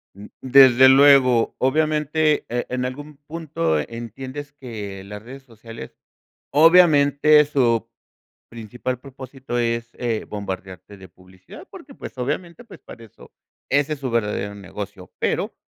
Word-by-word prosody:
Mm, 100 +1 -11
desde 130 -1 +6
luego, 130 -3 +5
obviamente, 155 +2 +1
eh, 120 +1 -2
en 125 0 -2
algún 145 +3 -8
punto 150 - -2
entiendes 130 - -7
que 105 -8 -8
las 105 +1 -9
redes 130 +4 -12
sociales, 115 - -12 0.6
obviamente, 150 -2 +5
su 120 -6 0 0.6
principal 120 +2 -6
propósito 130 -2 -7
es, 115 0 -2
eh, 115 -3 -3
bombardearte 95 -1 -7
de 95 -1 -14
publicidad, 90 +1 -16
porque, - - -13
pues, - - -10
obviamente, 170 - -4
pues, - - -15
para 115 - -13
eso, 110 - -18 0.4
ese 145 +2 +1
es - - -13
su 130 -2 -4
verdadero 105 -3 -2
negocio. 100 -1 -9
Pero, - - -2
125 Hz, 130 wpm, -21 LUFS, 105-145 Hz, 0.6 s, desde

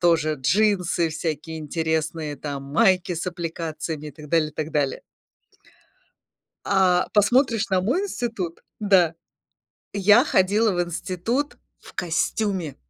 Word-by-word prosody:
тоже 160 -3 +3
джинсы 180 0 +2
всякие 160 0 -4
интересные, 160 0 -2
там 140 0 -5
майки 180 +6 +2
с 170 +1 -4
аппликациями 165 -3 -4
и - - -6
так 150 +1 -12
далее, 160 -2 +3
и - - -24
так 155 +1 -3
далее. 145 -3 -1 1.6
А 185 -2 +3
посмотришь 230 +1 +3
на 190 -1 +2
мой 250 - +1
институт 230 - -4 0.2
Да? 190 -6 +4 0.8
Я 205 +5 +5
ходила 205 -2 +3
в 175 -1 +1
институт 185 - -2 0.2
в - - -15
костюме 180 -1 -1
175 Hz, 120 wpm, -24 LUFS, 155-200 Hz, 1.6 s, Я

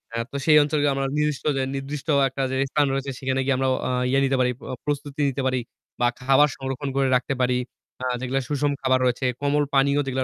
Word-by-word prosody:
আ - - -1
তো - - -9
সেই 155 -1 +6
অঞ্চলগুলো 145 -1 +1 0.3
নির্দিষ্ট 150 -2 -1 0.3
নির্দিষ্ট 140 +2 -5 0.2
একটা 135 - -5
যে - - -1 0.2
স্থান 150 -1 +3
রয়েছে 135 0 -2
সেখানে 130 0 -1
গিয়ে 135 -1 +2
আমরা 130 0 0 0.2
অ - - -1 0.2
ইয়ে 135 - +3
নিতে 135 0 +1
পারি। 125 0 +2 0.3
প্রস্তুতি 145 0 -3
নিতে 135 +1 -3
পারি 130 -1 +1 0.4
বা 120 - +3
খাবার 135 +3 +5
সংরক্ষণ 135 +1 -4
করে 135 -1 +2
রাখতে 130 +2 0
পারি। 125 0 +2 0.5
আ - - -1
যেগুলা 130 +2 -1
সুষম 145 0 0
খাবার 130 -1 +2
রয়েছে, 125 +1 0 0.2
কোমল 145 +1 +2
পানীয় 140 +1 +3
যেগুলো 130 0 -1
135 Hz, 200 wpm, -24 LUFS, 130-145 Hz, 0.5 s, সেই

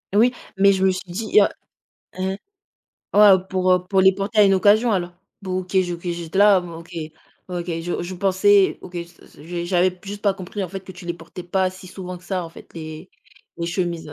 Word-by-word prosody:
Oui, 240 +4 +5 0.2
mais 200 0 +6
je 190 0 +1
me 190 - +4
suis 185 - -4
dit, 215 +4 -1
heu 200 - +5 0.7
heu 190 +1 -1 0.8
ouais, 205 -1 +8
heu, 185 -1 +3
pour, 185 -1 +2
heu, 180 0 +2
pour 195 -1 +3
les 190 0 +6
porter 200 +3 -3
à 210 - +8
une 195 -1 +5
occasion 210 +4 +4
alors. 175 -2 -1 0.3
Bon 185 -1 -2
OK, 185 +1 -10
OK, 190 - +5 0.2
j'ai 170 -2 -4
d 190 - -3
là, 200 -2 +6
OK, 170 -1 -10 0.6
OK, 175 -1 -4 0.2
je 175 +1 -3
je 180 +2 -6
pensais, 195 +1 +3
OK 180 - -12
s-s 170 0 -9
s 170 +3 -5
j'avais 180 0 +1
juste 205 +1 -7
pas 200 -2 +3
compris 195 +1 -6
en 180 - -3
fait 195 +2 -6
que 190 0 -11
tu 180 0 -12
les 170 - -2
portais 180 +1 -10
pas 185 +1 0
si 185 0 -12
souvent 180 -1 -7
que - - -21
ça, 185 -3 -2
en 165 - -9
fait - - -15
les 160 +2 -8 0.5
les 170 - -3
chemises, 170 -3 -3
185 Hz, 225 wpm, -22 LUFS, 175-195 Hz, 0.8 s, ouais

